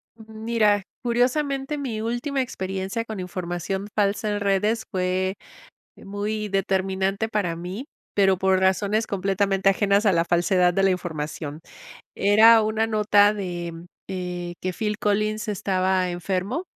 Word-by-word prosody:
Mm, 225 Hz, -, -14 dB, 0.2 s
mira. 210 Hz, -3 st, +3 dB, 0.2 s
Curiosamente, 270 Hz, +4 st, 0 dB
mi 245 Hz, -7 st, -3 dB
última 240 Hz, +5 st, -1 dB
experiencia 195 Hz, -1 st, -3 dB
con 220 Hz, -3 st, -6 dB
información 180 Hz, +2 st, -4 dB
falsa 205 Hz, +1 st, +1 dB
en 205 Hz, 0 st, -1 dB
redes 210 Hz, +3 st, +1 dB
fue, 185 Hz, 0 st, 0 dB, 0.6 s
eh, -, -, -15 dB
muy 210 Hz, +2 st, -3 dB
determinante 195 Hz, +1 st, 0 dB
para 205 Hz, -6 st, -1 dB
mí, 180 Hz, +8 st, -6 dB, 0.3 s
pero 195 Hz, -2 st, +3 dB
por 190 Hz, 0 st, +3 dB
razones 200 Hz, +3 st, +1 dB
completamente 195 Hz, 0 st, +1 dB
ajenas 200 Hz, +1 st, +2 dB
a 200 Hz, -, +5 dB
la 165 Hz, -1 st, +2 dB
falsedad 175 Hz, +1 st, +2 dB
de 195 Hz, -, +1 dB
la 195 Hz, -, +4 dB
información. 155 Hz, -4 st, -4 dB, 0.5 s
Era 220 Hz, +3 st, +6 dB
una 220 Hz, +1 st, 0 dB
nota 210 Hz, -2 st, +4 dB
de, 175 Hz, -4 st, -4 dB, 0.4 s
eh, 180 Hz, -2 st, -4 dB
que 185 Hz, -, -2 dB
Phil 210 Hz, +1 st, -2 dB
Collins 215 Hz, +1 st, 0 dB
estaba 190 Hz, -2 st, 0 dB
enfermo 185 Hz, -, -2 dB
195 Hz, 135 wpm, -24 LUFS, 185-215 Hz, 0.6 s, Era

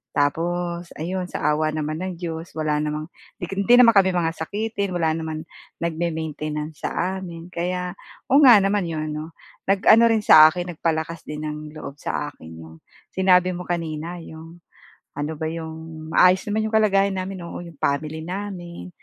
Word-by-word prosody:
Tapos 170 Hz, +4 st, -1 dB
ayon, 180 Hz, +3 st, -3 dB
sa -, -, -6 dB
awa 155 Hz, +1 st, +1 dB
naman 155 Hz, +1 st, -3 dB
ng 185 Hz, 0 st, -3 dB
Diyos 165 Hz, -1 st, -5 dB
wala 155 Hz, -1 st, 0 dB
namang 150 Hz, +2 st, -3 dB, 0.3 s
di 175 Hz, -, -4 dB
hindi 200 Hz, +5 st, +4 dB
naman 240 Hz, -2 st, +8 dB
kami 190 Hz, -2 st, +4 dB
mga 165 Hz, -2 st, +1 dB
sakitin 200 Hz, +2 st, -3 dB
wala 160 Hz, -2 st, +1 dB
naman 160 Hz, -1 st, -4 dB, 0.4 s
nagme-maintenance 155 Hz, -2 st, -3 dB
sa 190 Hz, +1 st, -2 dB
amin 170 Hz, -1 st, -9 dB
kaya 180 Hz, +1 st, -2 dB, 0.4 s
oo 275 Hz, -, +7 dB
nga 245 Hz, -5 st, +9 dB
naman 195 Hz, -2 st, +1 dB
iyon 155 Hz, -1 st, -3 dB
ano, 155 Hz, +2 st, -6 dB, 0.3 s
nag-ano 200 Hz, +4 st, +5 dB
rin 220 Hz, -2 st, +2 dB
sa 155 Hz, -4 st, +9 dB
akin 175 Hz, +1 st, -4 dB
nagpalakas 160 Hz, 0 st, -2 dB
din 150 Hz, 0 st, -5 dB
ng 150 Hz, 0 st, -6 dB
loob 145 Hz, -1 st, -8 dB
sa 145 Hz, 0 st, -3 dB
akin 80 Hz, -, -15 dB
yung 80 Hz, 0 st, -12 dB, 0.4 s
sinabi 185 Hz, -1 st, +4 dB
mo 180 Hz, 0 st, -6 dB
kanina 165 Hz, -1 st, -3 dB
yung 165 Hz, +2 st, -12 dB, 0.5 s
ano 150 Hz, +2 st, -2 dB
ba 160 Hz, -, -3 dB
yung 160 Hz, -1 st, -7 dB
maayos 185 Hz, +1 st, +5 dB
naman 215 Hz, +1 st, 0 dB
iyong 220 Hz, -, -2 dB
kalagayan 195 Hz, -1 st, +3 dB
namin, 185 Hz, -1 st, -5 dB
oo, 170 Hz, -, -7 dB
iyong 170 Hz, -3 st, -12 dB
family 155 Hz, +3 st, -1 dB
namin, 180 Hz, -2 st, -6 dB
170 Hz, 165 wpm, -23 LUFS, 155-185 Hz, 0.5 s, nga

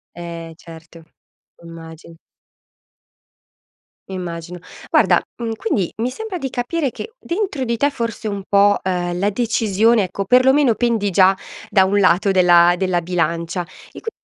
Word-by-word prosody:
Eh, 170 Hz, -1 st, -8 dB
certo. 165 Hz, 0 st, -14 dB, 0.6 s
Immagin 165 Hz, 0 st, -12 dB, 1.9 s
Immagino. 175 Hz, -1 st, -6 dB, 0.3 s
Guarda, -, -, +4 dB, 0.2 s
mhmm, 230 Hz, -2 st, -3 dB
quindi 210 Hz, -5 st, -2 dB
mi 235 Hz, +3 st, -1 dB
sembra 440 Hz, +2 st, -6 dB
di 270 Hz, -4 st, -4 dB
capire 265 Hz, +3 st, -2 dB
che 450 Hz, -, -9 dB
dentro 350 Hz, -6 st, -3 dB
di 235 Hz, -2 st, -1 dB
te 285 Hz, +5 st, +2 dB
forse 230 Hz, -4 st, -5 dB
un 200 Hz, -2 st, -4 dB
po', 200 Hz, 0 st, +4 dB
ehm, 175 Hz, -1 st, -2 dB
la 200 Hz, +3 st, +1 dB
decisione 225 Hz, -1 st, +2 dB
ecco 195 Hz, +2 st, -4 dB
perlomeno 255 Hz, +2 st, +4 dB
pendi 225 Hz, -4 st, 0 dB
già 190 Hz, +1 st, +4 dB, 0.3 s
da 190 Hz, -1 st, +4 dB
un 200 Hz, +1 st, +1 dB
lato 185 Hz, +1 st, +3 dB
della 175 Hz, -1 st, +5 dB
della 185 Hz, -2 st, 0 dB
bilancia 170 Hz, 0 st, -2 dB
e 175 Hz, -, -15 dB
quindi 450 Hz, -, -4 dB
195 Hz, 140 wpm, -19 LUFS, 175-235 Hz, 1.9 s, della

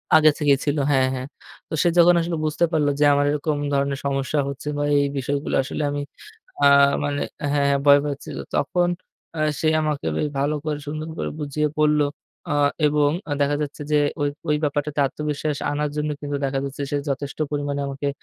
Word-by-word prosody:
আগে 155 Hz, 0 st, +7 dB
থেকেই 145 Hz, -2 st, +4 dB
ছিল। 145 Hz, +1 st, 0 dB
হ্যাঁ, 130 Hz, -1 st, +3 dB
হ্যাঁ। 130 Hz, +1 st, -5 dB, 0.4 s
তো -, -, -7 dB
সে -, -, +3 dB
যখন 175 Hz, +1 st, +7 dB
আসলে 165 Hz, -1 st, -2 dB
বুঝতে 155 Hz, +3 st, +1 dB
পারলো 150 Hz, -3 st, +2 dB
যে, -, -, +4 dB
আমার 145 Hz, 0 st, +2 dB
এরকম 150 Hz, 0 st, -1 dB, 0.2 s
ধরনের 140 Hz, 0 st, 0 dB
সমস্যা 140 Hz, +2 st, 0 dB
হচ্ছে 140 Hz, +1 st, -7 dB
বা 145 Hz, -, 0 dB
এই 140 Hz, 0 st, +4 dB
বিষয়গুলো 140 Hz, +2 st, -2 dB
আসলে 150 Hz, -, -4 dB
আমি 145 Hz, 0 st, -2 dB, 0.6 s
আ -, -, +7 dB, 0.4 s
মানে 145 Hz, 0 st, -2 dB, 0.3 s
হ্যাঁ, 145 Hz, -1 st, +2 dB
হ্যাঁ, 140 Hz, 0 st, +2 dB
ভয় 145 Hz, 0 st, +8 dB
পাচ্ছিল। 140 Hz, -1 st, -5 dB, 0.2 s
তখন 175 Hz, +4 st, +1 dB, 0.5 s
আ -, -, -3 dB, 0.2 s
সে 160 Hz, -, +2 dB
আমাকে 150 Hz, -, -2 dB
বে -, -, -1 dB, 0.2 s
ভালো 145 Hz, +2 st, +1 dB
করে, 150 Hz, -1 st, -1 dB
সুন্দর 155 Hz, +1 st, -4 dB
করে -, -, -2 dB
বুঝিয়ে 150 Hz, +1 st, -1 dB
বলল। 150 Hz, 0 st, +4 dB, 0.5 s
আ -, -, -1 dB, 0.3 s
এবং 145 Hz, -1 st, +3 dB, 0.3 s
দেখা 145 Hz, +1 st, +2 dB
যাচ্ছে 145 Hz, 0 st, -5 dB
যে, 150 Hz, -, +4 dB, 0.2 s
ওই, 145 Hz, -, +2 dB, 0.2 s
ওই 150 Hz, -, +3 dB
ব্যাপারটাতে 145 Hz, 0 st, -1 dB
আত্মবিশ্বাস 150 Hz, 0 st, -3 dB
আনার 150 Hz, 0 st, -1 dB
জন্য 150 Hz, 0 st, -1 dB
কিন্তু 145 Hz, -1 st, -3 dB
দেখা 135 Hz, 0 st, -1 dB
যাচ্ছে, 140 Hz, +1 st, -6 dB
সে -, -, 0 dB
যথেষ্ট 140 Hz, +1 st, -3 dB
পরিমাণে 145 Hz, -1 st, -2 dB
আমাকে 140 Hz, +1 st, -4 dB
145 Hz, 190 wpm, -23 LUFS, 140-150 Hz, 0.6 s, ভয়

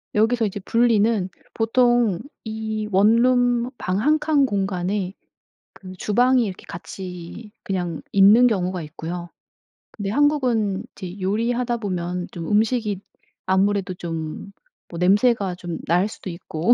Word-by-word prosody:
여기서 225 Hz, +2 st, +3 dB
이제 205 Hz, 0 st, -3 dB
분리는 220 Hz, -3 st, +2 dB, 0.2 s
보통 235 Hz, -3 st, +2 dB, 0.2 s
이 220 Hz, -1 st, -4 dB
원룸 240 Hz, +4 st, +3 dB
방 185 Hz, +2 st, -1 dB
1 305 Hz, +6 st, +3 dB
칸 295 Hz, -3 st, +3 dB
공간에 195 Hz, -2 st, -1 dB, 0.6 s
그 185 Hz, -1 st, -11 dB
주방이 245 Hz, +6 st, +2 dB
이렇게 190 Hz, -2 st, -7 dB
같이 180 Hz, +4 st, -8 dB
그냥 175 Hz, -4 st, -3 dB
있는 210 Hz, +5 st, +7 dB
경우가 185 Hz, -5 st, -1 dB
있고요. 165 Hz, +3 st, -6 dB, 0.6 s
근데 205 Hz, -2 st, -5 dB
한국은 240 Hz, -7 st, +1 dB
이제 185 Hz, +1 st, -8 dB
요리하다 235 Hz, +5 st, 0 dB
보면 180 Hz, -4 st, -3 dB
좀 165 Hz, -2 st, -6 dB
음식이 215 Hz, -2 st, +1 dB, 0.4 s
아무래도 190 Hz, 0 st, +1 dB
좀 165 Hz, +2 st, -6 dB, 0.4 s
뭐 170 Hz, -, -7 dB
냄새가 200 Hz, 0 st, +3 dB
좀 175 Hz, -2 st, -6 dB
날 180 Hz, +4 st, +3 dB
수도 190 Hz, -, -8 dB
있고 170 Hz, +4 st, 0 dB
205 Hz, 245 characters per minute, -22 LUFS, 180-235 Hz, 0.6 s, 있는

